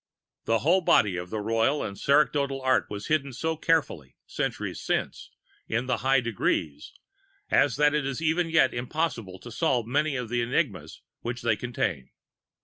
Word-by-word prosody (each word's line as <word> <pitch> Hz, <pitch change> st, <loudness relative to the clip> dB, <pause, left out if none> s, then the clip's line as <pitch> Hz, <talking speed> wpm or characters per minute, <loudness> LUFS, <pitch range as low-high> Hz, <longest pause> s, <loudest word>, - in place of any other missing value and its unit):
The 115 Hz, -, +2 dB
whole 180 Hz, +4 st, +4 dB
body 105 Hz, -, +3 dB
of 90 Hz, 0 st, -5 dB
the 110 Hz, +1 st, -3 dB
Royal 115 Hz, +7 st, +1 dB
and 100 Hz, -, -5 dB
Sacerdotal 140 Hz, +1 st, +2 dB
Art 130 Hz, 0 st, +2 dB
was 105 Hz, 0 st, -6 dB
hidden 140 Hz, -3 st, 0 dB
so 160 Hz, +6 st, -2 dB
carefully, 155 Hz, -, -1 dB
centuries -, -, -3 dB
since, -, -, -2 dB, 0.4 s
in 115 Hz, +3 st, -1 dB
the 130 Hz, -, 0 dB
High 135 Hz, 0 st, +2 dB
Degrees, 80 Hz, -10 st, -2 dB, 0.6 s
as 140 Hz, -4 st, +3 dB
that 150 Hz, +1 st, +3 dB
it 150 Hz, -1 st, +1 dB
is 135 Hz, -2 st, -3 dB
even 165 Hz, +2 st, +1 dB
yet 160 Hz, -5 st, +3 dB
impossible 120 Hz, -, -3 dB
to 120 Hz, -, -11 dB
solve 130 Hz, -7 st, 0 dB
many 145 Hz, +4 st, 0 dB
of 125 Hz, -3 st, -4 dB
the 120 Hz, 0 st, 0 dB
enigmas 120 Hz, -, -2 dB, 0.2 s
which 120 Hz, 0 st, -5 dB
they 115 Hz, -2 st, +2 dB
contain. 100 Hz, -, -3 dB
125 Hz, 165 wpm, -27 LUFS, 115-150 Hz, 0.6 s, whole